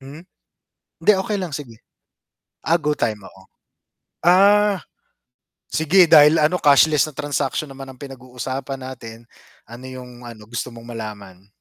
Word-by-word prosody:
Hmm, 140 Hz, +4 st, -12 dB, 0.8 s
hindi 195 Hz, -, +5 dB
okay 210 Hz, +3 st, -2 dB
lang 180 Hz, -3 st, -4 dB
sige. 120 Hz, -7 st, -11 dB, 0.9 s
Ah, 170 Hz, +2 st, +2 dB
GOtyme, 130 Hz, -8 st, -1 dB
oo. 95 Hz, -, -18 dB, 0.8 s
Ah, 200 Hz, +2 st, +4 dB, 0.9 s
sige 170 Hz, +4 st, +4 dB
dahil 150 Hz, +1 st, +7 dB
ano 155 Hz, +4 st, +2 dB
cashless 150 Hz, 0 st, +4 dB
na 150 Hz, -, -17 dB
transaction 145 Hz, 0 st, -2 dB
naman 135 Hz, 0 st, -10 dB
ang 130 Hz, -, -17 dB
pinag-uusapan 130 Hz, 0 st, -7 dB
natin, 115 Hz, -3 st, -10 dB, 0.4 s
ano 120 Hz, +2 st, -11 dB
yung 130 Hz, -1 st, -10 dB, 0.2 s
ano 110 Hz, -3 st, -12 dB
gusto 120 Hz, +1 st, -4 dB
mong 115 Hz, 0 st, -12 dB
malaman? 100 Hz, -4 st, -9 dB
135 Hz, 130 wpm, -20 LUFS, 120-155 Hz, 0.9 s, dahil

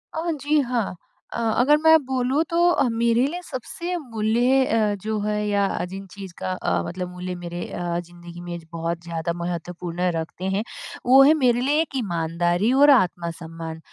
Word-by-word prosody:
अ, 330 Hz, +1 st, -1 dB
जी, 295 Hz, +1 st, +2 dB
हाँ, 240 Hz, -7 st, -2 dB, 0.4 s
अ, -, -, -3 dB, 0.2 s
अगर 295 Hz, +4 st, +5 dB
मैं 320 Hz, 0 st, +8 dB
बोलूँ 260 Hz, +3 st, +1 dB
तो 340 Hz, -6 st, +3 dB
मेरे 235 Hz, +2 st, +2 dB
लिए 350 Hz, +4 st, -5 dB
सबसे 340 Hz, +6 st, -5 dB
मूल्य 245 Hz, 0 st, +1 dB
अ, 215 Hz, -2 st, +1 dB
जो 215 Hz, 0 st, -2 dB
है 210 Hz, 0 st, -1 dB
या 200 Hz, -1 st, +2 dB, 0.2 s
जिन 195 Hz, +1 st, -7 dB
चीज़ 195 Hz, -2 st, -10 dB
का 185 Hz, -, -3 dB
अ, 90 Hz, -, -1 dB
मतलब 180 Hz, 0 st, -5 dB
मूल्य 180 Hz, 0 st, -5 dB
मेरे 175 Hz, 0 st, -6 dB
अ, 175 Hz, -1 st, -3 dB
ज़िंदगी 175 Hz, 0 st, -11 dB
में 175 Hz, -1 st, -6 dB
बहुत 165 Hz, 0 st, -3 dB
ज़्यादा 170 Hz, 0 st, -3 dB
महत्वपूर्ण 175 Hz, +1 st, -3 dB
रखते 165 Hz, +3 st, -5 dB
हैं, 210 Hz, -, 0 dB, 0.4 s
वो 265 Hz, +2 st, +7 dB
हैं 295 Hz, -, +7 dB
मेरे 245 Hz, -4 st, +2 dB
लिए 290 Hz, +4 st, +2 dB
एक 295 Hz, -4 st, -5 dB
ईमानदारी 175 Hz, 0 st, 0 dB
और 290 Hz, -, +8 dB
आत्मसम्मान, 165 Hz, -3 st, -3 dB
205 Hz, 170 wpm, -23 LUFS, 175-255 Hz, 0.4 s, मैं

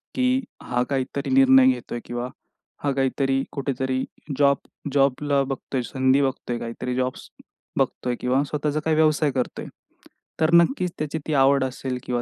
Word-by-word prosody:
की 255 Hz, 0 st, +2 dB, 0.2 s
हा 125 Hz, 0 st, -1 dB
काहीतरी 140 Hz, +1 st, -2 dB
निर्णय 265 Hz, -1 st, +7 dB
घेतोय 255 Hz, -, -1 dB
किंवा 120 Hz, +1 st, -4 dB, 0.6 s
हा 145 Hz, -, +1 dB
काहीतरी 135 Hz, 0 st, 0 dB
कुठेतरी 130 Hz, -2 st, -2 dB, 0.3 s
जॉब 140 Hz, -1 st, +4 dB, 0.4 s
जॉबला 140 Hz, +1 st, +2 dB
बघतोय, 135 Hz, -1 st, -3 dB
संधी 130 Hz, +2 st, +2 dB
बघतोय 130 Hz, -3 st, -2 dB
काहीतरी 125 Hz, +2 st, -4 dB
जॉब्स 130 Hz, 0 st, -2 dB, 0.5 s
बघतोय 125 Hz, -1 st, 0 dB
किंवा 130 Hz, +3 st, +1 dB
स्वतःचा 150 Hz, +1 st, -2 dB
काही 160 Hz, -1 st, +2 dB
व्यवसाय 155 Hz, -2 st, +3 dB
करतोय. 130 Hz, -1 st, -3 dB, 0.7 s
तर 160 Hz, +1 st, +2 dB
नक्कीच 180 Hz, +2 st, +4 dB
त्याची 155 Hz, +1 st, -3 dB
ती 155 Hz, -, -1 dB
आवड 135 Hz, 0 st, +4 dB
असेल 130 Hz, 0 st, -3 dB
किंवा 120 Hz, -1 st, -1 dB
135 Hz, 145 wpm, -24 LUFS, 130-150 Hz, 0.7 s, निर्णय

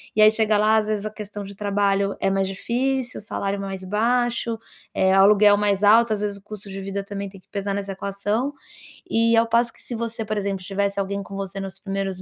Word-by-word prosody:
E 215 Hz, -, +4 dB
aí 215 Hz, -, +9 dB
chega 220 Hz, -1 st, +2 dB
lá, 215 Hz, +1 st, +4 dB
às 215 Hz, -, +2 dB
vezes 215 Hz, -1 st, -1 dB
a -, -, -3 dB
questão 210 Hz, -1 st, -7 dB
de 200 Hz, 0 st, -9 dB
trabalho 200 Hz, -1 st, +1 dB
é -, -, +1 dB
mais 195 Hz, 0 st, +1 dB
difícil, 250 Hz, +6 st, -1 dB
o -, -, -8 dB
salário 200 Hz, -1 st, -2 dB
é -, -, -6 dB
mais 190 Hz, -1 st, -6 dB
baixo, 235 Hz, +3 st, 0 dB, 0.3 s
eh, 190 Hz, 0 st, +3 dB
o -, -, +7 dB
aluguel 205 Hz, 0 st, +6 dB
mais 205 Hz, -1 st, +1 dB
alto, 220 Hz, +2 st, +6 dB
às 210 Hz, -, -3 dB
vezes 205 Hz, -1 st, -2 dB
o 200 Hz, -, -17 dB
custo 210 Hz, -1 st, -9 dB
de 195 Hz, 0 st, -6 dB
vida 195 Hz, +1 st, -4 dB
também 200 Hz, 0 st, -5 dB
tem 195 Hz, -1 st, -14 dB
que -, -, -44 dB
pesar 200 Hz, -1 st, -3 dB
nessa 200 Hz, 0 st, -3 dB
equação. 205 Hz, +7 st, -2 dB, 0.6 s
E 230 Hz, +1 st, +3 dB
ao 230 Hz, 0 st, +4 dB
passo 230 Hz, 0 st, +2 dB
que -, -, -18 dB
se 240 Hz, -, -6 dB
você, 230 Hz, 0 st, -3 dB
por 215 Hz, 0 st, -3 dB
exemplo, 195 Hz, -2 st, -2 dB
tivesse 200 Hz, +1 st, -1 dB
alguém 200 Hz, 0 st, -2 dB
com 195 Hz, +1 st, -9 dB
você 195 Hz, 0 st, -5 dB
nos 195 Hz, -1 st, -6 dB
primeiros 195 Hz, -1 st, -3 dB
205 Hz, 240 wpm, -23 LUFS, 195-220 Hz, 0.6 s, aí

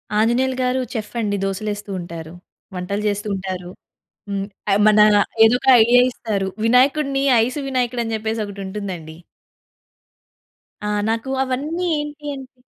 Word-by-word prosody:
ఆంజనేయులు 250 Hz, +4 st, +2 dB
గారు 255 Hz, +1 st, +1 dB
చెఫ్ 220 Hz, -1 st, -5 dB
అండి 205 Hz, -2 st, -1 dB
దోసలేస్తూ 205 Hz, +1 st, -4 dB
ఉంటారు. 165 Hz, -1 st, -8 dB, 0.4 s
వంటలు 200 Hz, +3 st, -3 dB
జేస్తూ 205 Hz, +1 st, -2 dB
ఉంటారు. 185 Hz, -2 st, -5 dB, 0.6 s
హ్మ్. 195 Hz, 0 st, -2 dB, 0.3 s
అయి 200 Hz, -, +3 dB
మన 210 Hz, 0 st, +5 dB, 0.5 s
ఏదోక 250 Hz, +4 st, +2 dB, 0.2 s
ఐడియా 245 Hz, +2 st, +5 dB
ఇస్తారు. 200 Hz, -5 st, -3 dB, 0.2 s
వినాయకుడిని 275 Hz, +3 st, +3 dB, 0.2 s
ఐస్ 255 Hz, +5 st, -3 dB
వినాయకుడు 250 Hz, -2 st, -1 dB
అని 225 Hz, 0 st, -4 dB
జెప్పేసి 220 Hz, 0 st, -2 dB
ఒకటుంటుందండి. 190 Hz, -5 st, -6 dB, 1.7 s
ఆ! -, -, -1 dB, 0.2 s
నాకు 230 Hz, +4 st, -2 dB
అవన్నీ 300 Hz, +8 st, -2 dB
ఏంటి 295 Hz, 0 st, -7 dB
అంటే 260 Hz, -1 st, -12 dB
220 Hz, 125 wpm, -20 LUFS, 200-255 Hz, 1.7 s, మన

